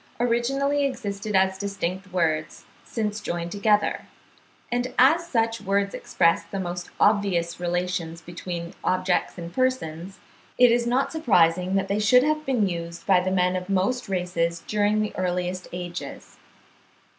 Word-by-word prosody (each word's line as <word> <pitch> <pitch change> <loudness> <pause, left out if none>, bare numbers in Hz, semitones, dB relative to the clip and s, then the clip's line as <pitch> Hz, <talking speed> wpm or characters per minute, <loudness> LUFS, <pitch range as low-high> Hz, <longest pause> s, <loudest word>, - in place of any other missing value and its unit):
originally 270 +4 +1
existed 210 -6 -3
as 190 0 +2
distinct 195 -1 -4
words, 160 -3 -1 0.2
since 215 -1 -3
joined 170 0 -4
together; 205 0 +1 0.6
and 245 +1 -1
as 320 +7 +5
such 225 -5 0
words 200 0 0
express 170 0 +1
the 195 +4 -5
most 175 -1 -4
obvious 195 -5 +2
relations 175 -1 -2
between 170 0 -6
objects 185 -1 0
and 170 0 -7
persons, 195 -8 -2 0.4
it 245 -1 +6
is 235 0 +2
not 255 +3 +1
surprising 185 - +2
that 195 0 +1
they 200 +2 0
should 250 +4 +5
have 305 +1 0
been 240 -7 +2
used 170 -1 -5
by 190 -2 +5
the 185 +1 -1
men 180 -1 +2
of 180 +1 -4
most 195 +5 0
races 170 -3 -1
during 210 0 +1
the 215 - -3
earliest 180 0 -2
ages. 175 0 -7
190 Hz, 145 wpm, -25 LUFS, 175-225 Hz, 0.6 s, it